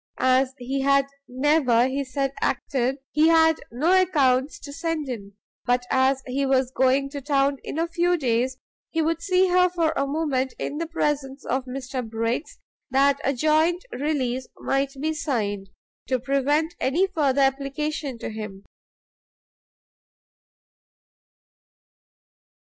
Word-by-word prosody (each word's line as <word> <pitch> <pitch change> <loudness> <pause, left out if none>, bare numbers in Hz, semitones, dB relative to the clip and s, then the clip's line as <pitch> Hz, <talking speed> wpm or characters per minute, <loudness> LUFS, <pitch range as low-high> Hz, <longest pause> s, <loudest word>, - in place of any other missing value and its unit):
As 260 0 +2
he 265 +2 -3
had 275 0 +3 0.2
never, 255 -2 +3
he 275 +2 -2
said, 275 +1 -2
acted, 260 0 0
he 305 +2 +4
had 320 -1 +5
no 330 +11 +3
accounts 275 -6 +2
to 285 - -9
send 325 -1 -2
in; 200 -6 -6 0.3
but 245 0 +1
as 265 0 +2
he 265 +2 -1
was 265 -2 +2
going 265 +1 +2
to 285 -1 -5
town 275 0 +1
in - - -5
a 330 +1 +1
few 350 +1 +1
days, 255 -2 0 0.3
he 325 - -2
would 330 +1 -1
see 370 +1 +3
her 360 0 +4
for 335 -3 0
a 275 - 0
moment 275 -3 -1
in 295 - -4
the 335 - -2
presence 290 -4 -2
of 260 +1 -1
Mr 260 0 -5
Briggs, 230 +5 -3 0.3
that 275 +1 +3
a 275 - +2
joint 315 - +2
release 260 -3 -2
might 275 0 -1
be 315 +3 -1
signed, 205 -10 -2 0.4
to 255 -1 0
prevent 280 +5 +1
any 315 +9 +2
future 295 -8 0
application 275 +1 -1
to 225 - -6
him. 210 -3 -7
275 Hz, 140 wpm, -24 LUFS, 255-310 Hz, 0.4 s, had